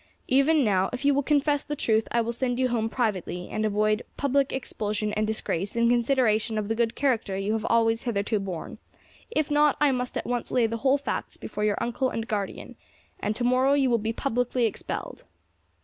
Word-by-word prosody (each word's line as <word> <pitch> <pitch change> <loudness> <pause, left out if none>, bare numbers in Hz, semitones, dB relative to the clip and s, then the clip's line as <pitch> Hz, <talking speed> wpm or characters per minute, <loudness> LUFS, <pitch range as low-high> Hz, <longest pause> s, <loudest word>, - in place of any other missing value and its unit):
Even 275 +3 +4
now, 190 -4 +2
if 250 +2 -5
you 285 - +5
will 280 - +2
confess 290 0 +1
the 295 - -4
truth, 220 -5 +1
I 235 - +2
will 230 +1 -2
send 245 0 -1
you 255 0 +1
home 225 -2 0
privately, 195 -7 -2
and 215 - -1
avoid 215 +1 +1 0.2
public 280 -1 +1
expulsion 215 -4 -3
and 215 0 0
disgrace 205 -3 -2
in 235 0 +3
consideration 235 -3 +2
of 210 -1 -2
the - - +2
good 230 0 0
character 230 -8 0
you 195 +2 -1
have 220 0 -2
always 225 0 +3
hitherto 215 -2 -1
borne; 190 -4 -6 0.5
if 310 -8 -1
not, 295 0 +4
I 295 -2 +4
must 250 -1 -2
at - - -3
once 245 -1 -2
lay 245 -2 +2
the 230 +1 -2
whole 270 +4 +3
facts 280 - -4
before 210 - -5
your 210 -1 +1
uncle 255 +2 -1
and 225 -1 -4
guardian, 205 -3 -4 0.4
and 210 - -1
to 245 - -3
morrow 255 +3 +3
you 270 -3 +3
will 235 - +3
be 220 +2 -2
publicly 245 0 0
expelled." 220 - -5
235 Hz, 205 wpm, -26 LUFS, 215-265 Hz, 0.5 s, you